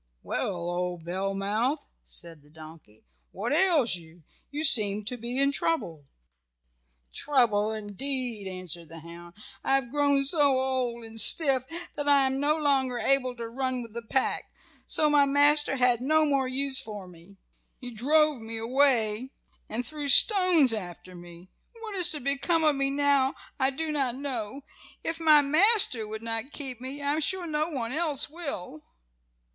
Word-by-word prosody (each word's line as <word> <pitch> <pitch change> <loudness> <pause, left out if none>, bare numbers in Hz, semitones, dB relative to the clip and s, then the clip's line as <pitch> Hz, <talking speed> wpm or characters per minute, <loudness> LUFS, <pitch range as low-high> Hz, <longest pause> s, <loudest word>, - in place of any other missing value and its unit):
"Well, 195 - -3
old 175 -1 -4
Bellmouth," 195 - -2 0.2
said 165 -3 -5
the 145 - -24
donkey, 155 - -16 0.3
"what - - -4
ails 310 - +2
you? 165 0 -17 0.3
You 295 +2 -5
seem 210 -7 +4
to 250 - -4
be 240 +2 -6
in 275 +1 +2
trouble." 170 - -3 1.1
"Trouble 225 -7 0
indeed," 220 +1 -3
answered 180 -3 -7
the 165 0 -11
hound. 170 +1 -13 0.3
"I 270 - +1
have 265 -3 -2
grown 285 -1 +1
so 285 -3 +2
old 255 -3 -3
and 225 0 0
stiff 270 - +6 0.3
that 290 -2 -6
I 280 -1 +4
am 265 0 -2
no 295 +2 0
longer 270 -4 0
able 255 0 0
to 235 -1 -7
run 255 +1 -4
with 230 -2 -13
the 235 - -6
pack, 255 +3 -2 0.4
so 305 - +2
my 295 -1 +4
master 290 0 +3
had 245 -2 +1
no 310 +4 +2
more 275 -3 0
use 270 +1 +1
for 205 -3 -9
me. 180 +3 -17 0.4
He 250 -2 -9
drove 295 +3 +2
me 225 0 -7
away 240 -1 +1 0.4
and 240 +3 -4
threw 295 +2 -6
stones 355 - +6
after 185 -3 -7
me. 175 +1 -14 0.3
What 445 -2 -8
is 360 -3 +3
to 300 - -3
become 280 +5 -1
of 305 -2 +2
me 275 0 -1
now 280 -1 +1 0.2
I 265 0 +2
do 310 +3 -4
not 270 -5 -1
know. 265 -1 -5 0.4
If 330 0 -4
my 305 -3 +5
master 310 - +4
would 220 +1 -8
not 225 +4 -3
keep 260 -4 -5
me 275 +3 -7
I 285 +1 0
am 310 - -2
sure 370 +3 -1
no 305 0 -2
one 245 -7 -5
else 300 -1 0
will." 280 - -7
260 Hz, 165 wpm, -26 LUFS, 215-290 Hz, 1.1 s, stiff